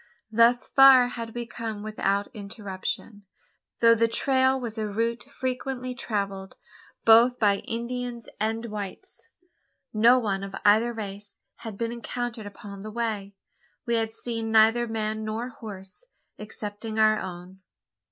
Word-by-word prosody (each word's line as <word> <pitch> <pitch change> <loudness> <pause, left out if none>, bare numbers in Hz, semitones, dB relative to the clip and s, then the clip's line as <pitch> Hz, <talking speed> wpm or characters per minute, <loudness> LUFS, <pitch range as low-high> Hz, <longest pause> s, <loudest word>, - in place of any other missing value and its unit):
Thus 235 +2 +4
far 265 -2 +7
had 230 -2 -7
we 240 0 -3
come 225 -3 -6
without 200 -2 -1
interruption. 205 0 -6 0.5
Though 230 0 +7
the 230 0 +3
trail 260 +2 +2
was 230 -3 -5
a 215 - -1
route 230 +3 -2
frequently 255 0 -4
travelled, 200 -5 -3 0.5
both 235 +3 +7
by 205 -2 +3
Indians 235 +1 -5
and 225 +2 -1
whites, 210 - -7 0.7
no 230 +4 +6
one 200 -5 -1
of 195 0 -6
either 220 +3 +5
race 205 -2 -7 0.2
had 220 -3 -8
been 230 +1 -2
encountered 235 -1 -5
upon 200 -1 -10
the 215 - -7
way. 215 -3 -3 0.5
We 235 - -1
had 225 -1 +1
seen 225 -1 -4
neither 225 +2 +5
man 220 -1 -2
nor 220 +3 -3
horse, 205 - -10 0.3
excepting 210 +1 -6
our 215 0 +4
own. 180 +1 -8
225 Hz, 135 wpm, -26 LUFS, 205-235 Hz, 0.7 s, far